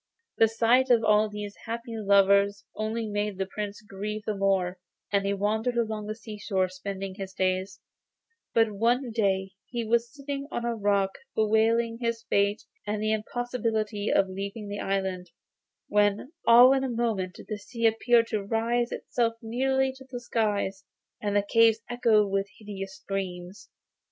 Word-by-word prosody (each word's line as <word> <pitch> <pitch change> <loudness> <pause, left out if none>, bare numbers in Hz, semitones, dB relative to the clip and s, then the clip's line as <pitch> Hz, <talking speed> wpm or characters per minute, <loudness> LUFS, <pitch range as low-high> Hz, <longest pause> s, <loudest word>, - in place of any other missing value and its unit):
The 225 - +7
sight 235 +4 +3
of 235 -2 +5
all 215 0 +4
these 210 -1 -6
happy 230 +1 -5
lovers 200 -1 +3
only 220 +1 -2
made 205 -1 -2
the 190 - -1
Prince 205 +1 -6
grieve 210 +2 -5
the 215 - -1
more, 190 -2 +1 0.3
and 200 -1 +2
he - - +1
wandered 220 +4 0
along 220 -2 -1
the 215 - -3
seashore 205 -4 -2
spending 190 +1 -5
his 190 -1 -7
days; 185 +1 -1 0.7
but 225 -1 +3
one 235 +5 +1
day 195 -3 0 0.2
he 240 -1 -3
was 235 +1 +1
sitting 280 0 -5
on 240 - -3
a 235 - 0
rock 200 -2 +1 0.2
bewailing 225 +2 +2
his 230 -1 -1
fate, 200 -1 +1 0.2
and 210 0 -1
the 215 +1 +1
impossibility 220 -2 -2
of 195 - +3
leaving 200 +3 -6
the 205 0 -4
island, 190 -2 -2 0.6
when 205 +5 +1 0.2
all 245 +3 +9
in 270 -1 +1
a 265 - -1
moment 225 -6 -1
the 215 -2 -4
sea 230 +3 -4
appeared 230 +1 +4
to 215 -3 -1
raise 235 +3 0
itself 230 -2 -1
nearly 265 +3 0
to 265 - -13
the 245 -2 -5
skies, 205 -5 -1 0.4
and 205 -1 -1
the 205 0 +2
caves 230 0 +4
echoed 220 -5 +3
with 195 0 0
hideous 195 -3 -7
screams. 190 -1 -6
215 Hz, 160 wpm, -27 LUFS, 200-230 Hz, 0.7 s, all